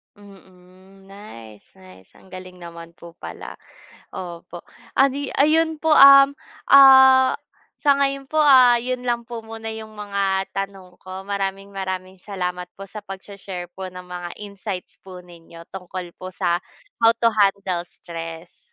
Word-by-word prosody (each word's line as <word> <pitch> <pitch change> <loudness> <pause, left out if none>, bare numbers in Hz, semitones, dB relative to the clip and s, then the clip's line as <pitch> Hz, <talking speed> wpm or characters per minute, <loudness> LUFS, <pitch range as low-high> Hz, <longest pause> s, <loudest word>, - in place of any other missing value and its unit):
Mm, 190 -1 -19
nice, 115 - -14
nice 95 0 -17
ang - - -21
galing 185 -1 -11
naman 170 -1 -11
po 170 0 -15
pala, - - -9 0.6
opo, 175 -1 -9 0.4
ah, 270 - +7
di 280 +1 -4
ayun 315 +2 +2
po, 320 0 +2
um, 275 0 +8 0.3
ah, 265 -1 +7 0.4
sa 285 -2 +3
ngayon 275 -1 -1
po, 310 +2 +1
ah, 255 -4 +7
yun 250 0 -4
lang 235 -1 -1
po 235 0 -8
muna 225 0 -7
yung 220 0 -9
mga 200 -2 -2
tanong 195 -2 -7
ko, 185 0 -9
maraming-maraming 195 -1 -5
salamat 180 -2 -5
po 195 0 -11
sa 210 -1 -10
pag-shi-share 190 -2 -9
po 190 +1 -8
ng 180 0 -10
mga 180 -1 -8
insights 200 -2 -8
po 185 -1 -12
ninyo 170 -1 -15
tungkol 180 -1 -8
po 185 0 -9
sa 175 -2 0 0.4
how 230 0 +4
to 230 0 +2
handle 195 -4 0
stress. 165 -1 -10
195 Hz, 145 wpm, -21 LUFS, 180-230 Hz, 0.6 s, um